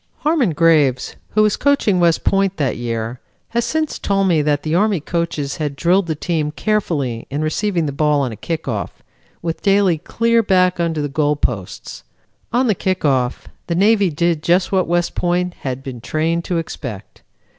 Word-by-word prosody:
Harmon 300 Hz, -, +2 dB
Graves, 150 Hz, -5 st, +2 dB, 0.2 s
who 215 Hz, -, +5 dB
was 210 Hz, -1 st, +2 dB
coaching 275 Hz, -10 st, +2 dB
West 170 Hz, -2 st, +2 dB
Point 195 Hz, -1 st, +1 dB
that 140 Hz, -4 st, 0 dB
year, 115 Hz, 0 st, -4 dB, 0.3 s
has 235 Hz, 0 st, 0 dB
since 315 Hz, -1 st, -1 dB
told 195 Hz, -1 st, +1 dB
me 165 Hz, -4 st, +3 dB
that 145 Hz, -1 st, 0 dB
the 155 Hz, -, -2 dB
Army 200 Hz, +1 st, +2 dB
coaches 155 Hz, -3 st, -3 dB
had 150 Hz, -3 st, -3 dB
drilled 175 Hz, +5 st, +2 dB
the 160 Hz, -, -1 dB
team 155 Hz, -1 st, -1 dB
carefully 150 Hz, -, -1 dB
in 145 Hz, +3 st, -2 dB
receiving 170 Hz, +2 st, 0 dB
the 145 Hz, -, -2 dB
ball 150 Hz, 0 st, +2 dB
on 130 Hz, -3 st, -1 dB
a -, -, -6 dB
kick 160 Hz, +6 st, -4 dB
off 105 Hz, -7 st, -4 dB, 0.4 s
with 165 Hz, -1 st, -3 dB
Daly 195 Hz, -5 st, +3 dB
clear 230 Hz, +6 st, +1 dB
back 185 Hz, -4 st, +2 dB
under 165 Hz, -3 st, 0 dB
the -, -, -1 dB
goal 145 Hz, +1 st, +1 dB
posts. 110 Hz, -10 st, -4 dB, 0.5 s
On 245 Hz, +3 st, +2 dB
the 220 Hz, -, +3 dB
kick 185 Hz, -2 st, -2 dB
off, 130 Hz, -3 st, 0 dB, 0.2 s
the 170 Hz, -, -1 dB
Navy 200 Hz, +1 st, +4 dB
did 165 Hz, 0 st, 0 dB
just 175 Hz, +3 st, +2 dB
what 190 Hz, -2 st, +2 dB
West 175 Hz, 0 st, 0 dB
Point 180 Hz, 0 st, 0 dB
had 130 Hz, -1 st, -4 dB
been 125 Hz, -4 st, -7 dB
trained 165 Hz, +6 st, -1 dB
to 175 Hz, -, -1 dB
expect. 110 Hz, -10 st, -6 dB
165 Hz, 185 wpm, -19 LUFS, 145-195 Hz, 0.5 s, who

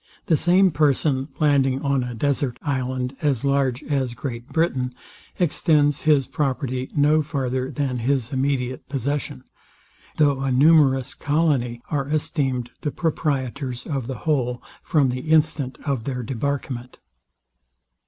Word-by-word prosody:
The 165 Hz, -, +3 dB
same 180 Hz, +4 st, +4 dB
person 140 Hz, -2 st, +1 dB
landing 135 Hz, -3 st, +2 dB
on 140 Hz, -2 st, +1 dB
a 125 Hz, -1 st, -5 dB
desart 140 Hz, 0 st, -1 dB
island, 130 Hz, -2 st, -2 dB
as 140 Hz, -3 st, 0 dB
large 140 Hz, -1 st, +1 dB
as 135 Hz, -5 st, -1 dB
Great 120 Hz, -3 st, -6 dB
Britain, 130 Hz, -7 st, 0 dB, 0.4 s
extends 150 Hz, -4 st, +2 dB
his 140 Hz, -3 st, +5 dB
property 130 Hz, -2 st, -2 dB
no 150 Hz, +1 st, +4 dB
farther 130 Hz, -3 st, -2 dB
than 135 Hz, -2 st, -2 dB
his 130 Hz, 0 st, 0 dB
immediate 130 Hz, -2 st, -1 dB
possession; 140 Hz, 0 st, -3 dB, 0.7 s
though 145 Hz, -3 st, +3 dB
a 135 Hz, -1 st, 0 dB
numerous 135 Hz, -1 st, +4 dB
colony 145 Hz, -6 st, 0 dB
are 140 Hz, -3 st, -1 dB
esteemed 135 Hz, -5 st, -1 dB
the 150 Hz, -, -1 dB
proprietors 135 Hz, -5 st, -2 dB
of 135 Hz, -6 st, -3 dB
the 130 Hz, -, -4 dB
whole 125 Hz, -5 st, 0 dB, 0.2 s
from 145 Hz, -5 st, +2 dB
the 130 Hz, +5 st, -4 dB
instant 155 Hz, -4 st, +2 dB
of 135 Hz, -6 st, -1 dB
their 125 Hz, -3 st, -3 dB
debarkment. 130 Hz, 0 st, -3 dB
135 Hz, 130 wpm, -23 LUFS, 125-145 Hz, 0.7 s, his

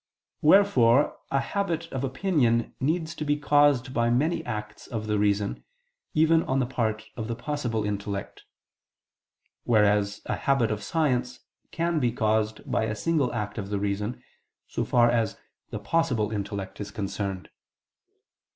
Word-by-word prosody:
Wherefore 150 Hz, -, +5 dB
a 135 Hz, -, +2 dB
habit 170 Hz, +2 st, -2 dB
of 130 Hz, 0 st, -3 dB
opinion 130 Hz, -5 st, +1 dB
needs 160 Hz, +4 st, -1 dB
to 155 Hz, -, -5 dB
be 145 Hz, 0 st, +1 dB
caused 145 Hz, -3 st, +3 dB
by 120 Hz, -2 st, +2 dB
many 160 Hz, +7 st, +1 dB
acts 105 Hz, -2 st, -6 dB
of 110 Hz, -3 st, -4 dB
the 105 Hz, -1 st, 0 dB
reason, 100 Hz, 0 st, 0 dB, 0.5 s
even 160 Hz, +1 st, +5 dB
on 130 Hz, -, -1 dB
the 130 Hz, -, +2 dB
part 110 Hz, -4 st, -2 dB
of 110 Hz, -2 st, -4 dB
the 115 Hz, -, -3 dB
"possible" 125 Hz, -5 st, -2 dB
intellect: 100 Hz, -1 st, -4 dB, 1.2 s
whereas 105 Hz, -2 st, +2 dB
a -, -, -1 dB
habit 135 Hz, -5 st, +1 dB
of 105 Hz, -1 st, -2 dB
science 125 Hz, -2 st, -1 dB, 0.3 s
can 170 Hz, -1 st, 0 dB
be 120 Hz, -4 st, +1 dB
caused 110 Hz, -1 st, 0 dB
by 110 Hz, -, 0 dB
a 105 Hz, -1 st, -2 dB
single 155 Hz, +1 st, +1 dB
act 105 Hz, -1 st, -4 dB
of 100 Hz, -1 st, -5 dB
the 105 Hz, -, -1 dB
reason, 105 Hz, +3 st, -2 dB, 0.4 s
so -, -, -2 dB
far 120 Hz, -1 st, +4 dB
as 115 Hz, -4 st, 0 dB, 0.3 s
the -, -, -5 dB
possible 125 Hz, -11 st, 0 dB
intellect 100 Hz, -1 st, -4 dB
is 105 Hz, -, -5 dB
concerned. 100 Hz, -2 st, -4 dB
120 Hz, 150 wpm, -26 LUFS, 105-145 Hz, 1.2 s, Wherefore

